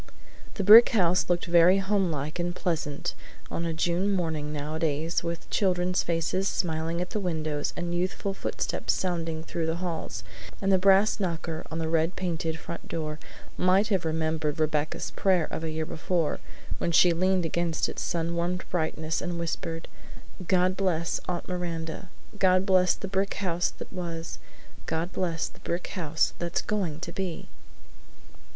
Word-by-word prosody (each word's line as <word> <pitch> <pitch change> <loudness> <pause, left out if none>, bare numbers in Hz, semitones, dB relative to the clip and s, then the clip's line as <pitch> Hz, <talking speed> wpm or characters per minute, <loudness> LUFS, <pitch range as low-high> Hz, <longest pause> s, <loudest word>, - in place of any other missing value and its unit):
The 200 - -1
brick 220 +5 +10
house 180 -1 +3
looked 175 -1 +1
very 175 +2 +6
homelike 180 -6 0
and 175 0 -1
pleasant 160 -6 -2 0.4
on 170 - -2
a - - -1
June 175 +4 +1
morning 160 -5 -1
nowadays 155 +2 -1
with 170 -1 -4
children's 180 -2 +2
faces 170 +3 0
smiling 165 -2 -1
at 180 - -4
the 215 - -1
windows 155 -5 -1
and 175 0 -2
youthful 185 +3 -1
footsteps - - -2
sounding 165 -3 -2
through 165 -1 -3
the 160 - 0
halls; 170 - -4 0.4
and 195 0 +1
the 190 - +5
brass 195 +3 +5
knocker 165 -3 -3
on 160 - -4
the 165 -1 -1
red 165 +2 +1
painted 165 -3 -2
front 170 - -8
door 155 -2 -4 0.4
might 190 +4 +3
have 195 -5 +1
remembered 160 -1 -1
Rebecca's 155 -1 0
prayer 185 -4 +2
of - - -3
a 160 - -1
year 155 0 -2
before, 165 0 -1 0.4
when 170 - 0
she 175 +1 +6
leaned 185 +1 +2
against 170 0 0
its - - -5
sun 170 0 -1
warmed 175 +2 -1
brightness 160 -2 -1
and 175 -1 -3
whispered: 165 0 -3 0.6
"God 185 0 +3
bless 170 -4 0
Aunt 175 -1 -3
Miranda; 170 -1 -4 0.3
God 185 0 +4
bless 185 -2 +4
the 195 - -6
brick 195 +1 0
house 175 -3 0
that - - -9
was; 170 -2 -5 0.5
God 165 +3 -2
bless 170 -3 -1
the - - -14
brick 175 +1 -3
house 160 -4 0
that's 175 0 -1
going 185 -8 -1
to 170 - -4
be!" 185 -2 -4
170 Hz, 160 wpm, -27 LUFS, 160-185 Hz, 0.6 s, brick